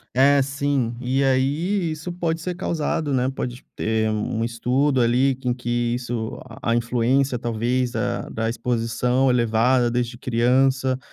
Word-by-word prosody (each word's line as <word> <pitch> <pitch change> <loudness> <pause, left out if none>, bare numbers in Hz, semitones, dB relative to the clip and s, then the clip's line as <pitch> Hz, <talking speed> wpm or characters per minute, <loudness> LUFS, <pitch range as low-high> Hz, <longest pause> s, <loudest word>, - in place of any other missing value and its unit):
É, 140 +2 +5
sim. 140 -3 -1
E 130 +2 0
aí, 155 +8 +1
isso 155 +3 -5
pode 165 -2 -2
ser 180 +1 -3
causado, 160 -3 -1
né, 130 0 +1
pode 125 -2 -5
ter 110 0 0
um 110 +1 -2
um - - +1
estudo 125 +4 +1
ali 125 +3 +3
com 125 -2 -2
que 120 -1 -1
isso 120 -2 -4 0.2
a-a 115 - +1
influência, 125 +2 +1
talvez, 120 +2 -1
da - - -2
da 115 0 -2
exposição 125 +2 0
elevada 120 +1 +3
desde 120 0 -2
criança, 130 +2 +2
125 Hz, 145 wpm, -23 LUFS, 120-135 Hz, 0.2 s, É